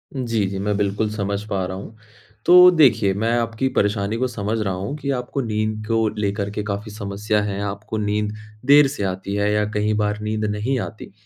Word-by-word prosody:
जी, 115 -5 0
जी। 95 0 -4
मैं 105 +1 0
बिल्कुल 105 +1 0
समझ 100 -1 -2
पा 95 -2 -1
रहा 95 +1 -5
हूँ। 105 +3 -9 0.5
तो 180 +1 +9
देखिए 115 - +4
मैं 110 +4 0
आपकी 115 +3 -1
परेशानी 105 +1 +1
को 130 - 0
समझ 110 -2 -3
रहा 95 -3 -1
हूँ 95 +9 -4
कि 140 -1 -5
आपको 125 +2 -3
नींद 110 -1 -2
को 115 -1 +2
लेकर 100 0 -1
के 105 0 -3
काफ़ी 105 +1 -4
समस्या 105 0 -1
है 100 -1 -3
आपको 105 +2 -5
नींद 105 0 -1 0.3
देर 145 +1 +7
से 130 -7 -4
आती 95 +1 -3
है 105 0 +1
या 105 0 +2
कई 105 0 +1
बार 105 0 -1
नींद 105 0 -2
नहीं 105 +6 -1
आती 110 -2 -7
105 Hz, 205 wpm, -22 LUFS, 100-115 Hz, 0.5 s, तो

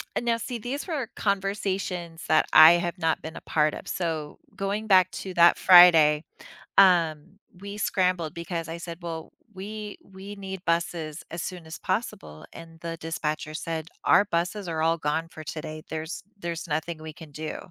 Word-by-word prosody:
And - - -2
now 230 -1 +2
see 240 +1 -5
these 255 - -5
were 290 -9 -2
conversations 195 -4 -2
that 155 - +4
I 160 +2 +10
have 175 +1 -1
not 160 -2 0
been 160 +1 -8
a - - -8
part 150 -1 +1
of. - - -8
So, 160 -4 -3 0.2
going 200 +2 -3
back 185 -2 +5
to 190 - -6
that 170 0 +6
Friday, 165 -4 +7 0.5
um 175 -1 +4 0.2
we 200 +1 -7
scrambled 180 -6 0
because 170 -1 -5
I 165 - -5
said, 170 0 -8
"Well, 165 -2 -6 0.2
we 210 +2 -7
we 195 +1 -10
need 190 -2 -7
buses 165 -2 -2
as 170 - -4
soon 180 -2 -6
as 160 +1 -9
possible," 80 - -4
and 165 0 -12
the 165 0 -5
dispatcher 155 -1 -3
said, 160 -1 -4 0.2
"Our 200 - +5
buses 180 +2 -2
are 160 -1 -2
all 165 +1 +2
gone 160 +1 -1
for 155 - -10
today. 155 +1 -6
There's 160 +3 -5 0.2
there's 170 -2 -5
nothing 155 +1 -3
we 155 0 -8
can 155 -1 -13
do." 155 +2 -5
170 Hz, 175 wpm, -26 LUFS, 160-190 Hz, 0.5 s, I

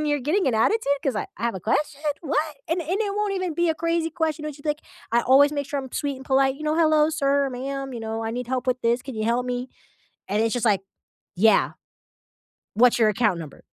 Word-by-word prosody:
and 305 - -1
you're 290 0 +1
getting 315 +8 +1
an 245 - 0
attitude 285 - +2
'cause 270 -6 0
I - - -2
I - - -8
have 235 - 0
a 190 - -5
question? 280 - -1 0.2
What?" 305 0 -1
And 340 +2 0
and 360 +7 -2
it 405 -2 -1
won't 420 -1 0
even 370 -4 -2
be 345 +1 +1
a 320 - +2
crazy 335 0 -1
question 320 -1 -2
when 305 - -3
she's, 285 - -16
like 300 0 -1 0.3
I 235 - +4
always 280 +4 +5
make 285 -1 -2
sure 285 - -2
I'm 265 -1 -10
sweet 285 -2 -2
and 265 - -11
polite, 270 0 +2
you 305 - -10
know, 305 0 +1
"Hello 310 -2 +4
sir, 280 -2 +1
ma'am, 270 +1 -4
you 235 - -5
know, 225 0 -4
I 225 - -2
need 245 0 -4
help 255 0 -2
with 255 0 0
this, 235 +2 +1
can 265 - -7
you 215 0 -2
help 240 +2 +1
me?" 250 +1 -3 0.6
And 205 +2 0
it's 225 - +1
just, 245 -1 -1
like, 200 -3 +3 0.5
"Yeah. 215 +4 +4 1.0
What's 240 +2 +5
your 220 -1 +5
account 205 -4 +1
number?" 155 -4 -10
275 Hz, 250 wpm, -24 LUFS, 240-310 Hz, 1.0 s, always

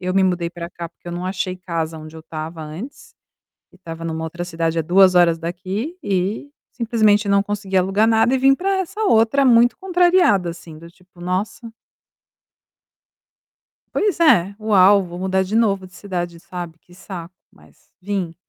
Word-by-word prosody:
eu 185 +1 -3
me 195 - +4
mudei 180 -2 0
para 170 0 -8
cá, 170 -1 -7
porque 175 +1 -14
eu - - -5
não 180 +1 -4
achei 185 -1 -3
casa 165 -3 -4
onde 155 +1 -11
eu 160 - -9
estava 160 +1 -7
antes, 200 - -9 0.6
e - - -18
estava 165 -2 -8
em - - -2
uma 160 0 -4
outra 170 +2 -5
cidade, 165 -1 -2
há - - +2
2 180 +3 +4
horas 170 -2 +4
daqui, 190 - -5
e 195 +8 -2 0.2
simplesmente 220 -3 +2
não 200 0 +3
consegui 205 -2 -4
alugar 195 +4 +2
nada 225 +2 +3
e - - +3
vim 270 +1 +4
para 385 +5 -1
essa 390 +4 -4
outra, 230 - +3
muito 240 -1 +4
contrariada 355 - +3
assim, 165 -2 -12
do 170 - -12
tipo: 180 0 -24
"Nossa". 190 +6 -3 2.2
Pois 410 -4 0
é, 200 - +4
"Uau, 200 -2 +5
vou 175 0 -9
mudar 190 0 0
de 195 +4 -4
novo 200 -5 +1
de 185 - -23
cidade", 175 -3 -5
sabe, 175 -1 -8
"que 175 - -22
saco", 180 -2 -9 0.2
mas - - -24
vim. 185 -3 -3
185 Hz, 180 wpm, -20 LUFS, 170-220 Hz, 2.2 s, Uau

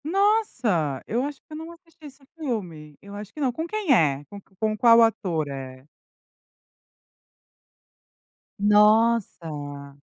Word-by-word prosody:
Nossa! 285 - 0
Eu 240 +3 -1
acho 290 0 -5
que - - -89
eu - - -7
não 320 +2 -8
assisti 335 -2 -18
esse 275 -1 -13
filme. 180 - -5
Eu 200 0 -12
acho 205 +1 -8
que - - -11
não, 265 -4 +1
com 320 +7 -5
quem 415 -7 +1
é? 145 -6 +2
Com 200 +7 -11 0.2
com 215 -1 0
qual 230 +1 +6
ator 175 -9 0
é? 130 -1 -8 2.7
Nossa! 200 -10 +1
215 Hz, 130 wpm, -24 LUFS, -, 2.7 s, qual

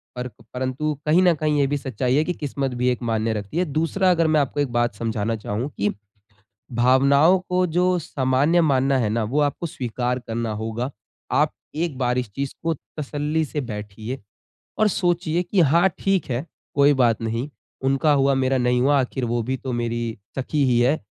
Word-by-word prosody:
पर 125 0 -4 0.3
परंतु 130 +4 -1
कहीं 155 +4 +4
न 180 -2 +5
कहीं 150 -1 0
ये 140 - +3
भी 145 +1 0
सच्चाई 130 -2 -1
है 150 - +4
कि 180 - -2
किस्मत 140 -4 -3
भी 125 - +3
एक 125 - 0
मान्य 110 -1 0
रखती 105 +6 -5
है। 180 - +2
दूसरा 165 +5 +1
अगर 165 -2 +3
मैं 155 - +5
आपको 145 +1 -1
एक 145 -4 0
बात 120 -2 +1
समझाना 110 0 -2
चाहूँ 110 +4 -3
कि 105 +1 +1 0.9
भावनाओं 140 +8 +5
को 180 0 +2
जो 180 0 +3
सामान्य 140 +2 +1
मानना 135 -3 +2
है 115 -4 +1
ना 115 +1 0
वो 130 +8 0
आपको 145 +3 0
स्वीकार 125 -3 -2
करना 115 -2 -3
होगा। 115 +4 -3 0.4
आप 150 +3 +3 0.2
एक 160 -4 -2
बार 125 -1 +1
इस 125 -4 -3
चीज़ 140 -1 -3
को 165 0 0 0.2
तसल्ली 150 +1 -1
से 150 0 -3
बैठिए 110 +1 -6 0.6
और 215 - +4
सोचिए 175 -3 0
कि 185 +2 0
हाँ 170 +4 +5
ठीक 195 -2 +1
है, 125 +4 -2 0.3
कोई 145 0 +5
बात 120 -5 +2
नहीं। 115 +5 -2 0.3
उनका 135 +3 +2
हुआ 140 -1 +3
मेरा 130 0 +1
नहीं 125 0 +2
हुआ 140 +2 +4
आखिर 130 0 -1
वो 120 0 0
भी 130 +3 -2
तो 130 - -5
मेरी 120 -1 -2 0.2
सखी 140 +2 0
ही 125 -2 +3
है। 130 +6 +3
135 Hz, 195 wpm, -23 LUFS, 120-155 Hz, 0.9 s, न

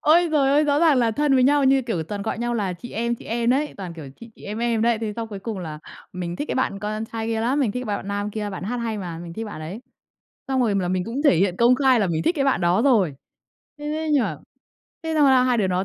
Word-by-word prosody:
Ôi 335 +3 +4
giời 275 -3 +3
ơi! 295 +2 +4
Rõ 290 0 +2
ràng 310 -6 +5
là 230 -2 +3
thân 290 +3 +1
với 255 - +4
nhau 285 0 +4
như 265 0 +4
kiểu 225 -9 -2
toàn 200 +5 -5
gọi 220 - -3
nhau 240 0 -1
là 200 -5 -1
chị 210 +8 -10
em, 235 +2 -1
chị - - -13
em 235 +1 0
đấy, 290 +4 0
toàn, 180 -4 -7
kiểu, 145 -5 -9
chị 230 0 -11
chị - - -18
em 210 +2 -5
em 235 -2 0
đấy. 235 -1 +2
Thế 215 -2 -3
xong 225 -1 -4
cuối 200 -2 -6
cùng 215 -2 -5
là 155 -4 -6 0.3
mình 175 -1 -4
thích 295 - -4
cái - - -1
bạn 230 -6 -1
con 215 +2 -3
trai 225 0 -5
kia 225 -1 -1
lắm, 260 +6 +1
mình 225 -7 +1
thích 250 -1 -4
bạn 205 -1 -1
bạn 195 - -9
nam 205 +1 -2
kia, 210 -1 -4
bạn 190 -2 -6
hát 245 +5 -2
hay 225 -2 -3
mà, 175 -4 -6
mình 170 0 -8
thích 225 +6 -5
bạn 205 -7 -8
ấy. 180 +9 -7 0.7
Xong 265 -1 +1
rồi 220 -5 +2
m - - +2
là 180 -2 -1
mình 185 0 0
cũng 250 +6 -3
thể 235 - +5
hiện 185 0 +1
công 240 +2 +5
khai 260 -3 +3
là 200 - +2
mình 165 -2 -1
thích 350 - +1
cái 275 - +1
bạn 270 -8 +2
đó 175 +5 +2
rồi. 215 - +3 0.6
Thế 295 - -9
thế 315 +1 -2
nhưng 280 -4 +4
mà - - -3 0.7
thế 320 0 -2
xong 295 -2 +4
là 260 -1 +5
hai 250 -1 +2
đứa 195 - +2
nó 185 +1 0
225 Hz, 305 wpm, -23 LUFS, 195-265 Hz, 0.7 s, ràng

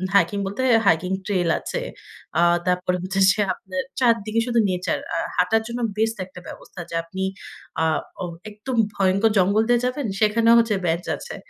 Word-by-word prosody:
Hiking 200 +1 +3
বলতে 200 +5 -4 0.2
hiking 170 +1 +2
trail 180 -5 0
আছে। - - -4 0.6
আ - - +5 0.3
তারপরে 180 0 +1
হচ্ছে 190 +1 -2
যে 200 - -3
আপনের 185 -1 -5 0.2
চারদিকে 230 -3 +2
শুধু 235 -1 +2
নেচার। 180 0 -1 0.2
আর - - 0
হাঁটার 225 0 +3
জন্য 240 +1 -4 0.2
বেস্ট 225 +1 0
একটা 180 -1 -12
ব্যবস্থা - - -11
যে, - - -5
আপনি 185 +3 -7 0.6
আ - - +3 0.4
অ - - -1 0.2
একদম 215 +5 -6 0.2
ভয়ংকর 195 +3 +2
জঙ্গল 200 +4 +3
দিয়ে 240 -1 +4
যাবেন। 255 +2 -2
সেখানেও 225 +2 +4
হচ্ছে 230 -2 +2
বেঞ্চ 170 +1 0
আছে। - - -8
200 Hz, 165 wpm, -23 LUFS, 185-230 Hz, 0.6 s, আ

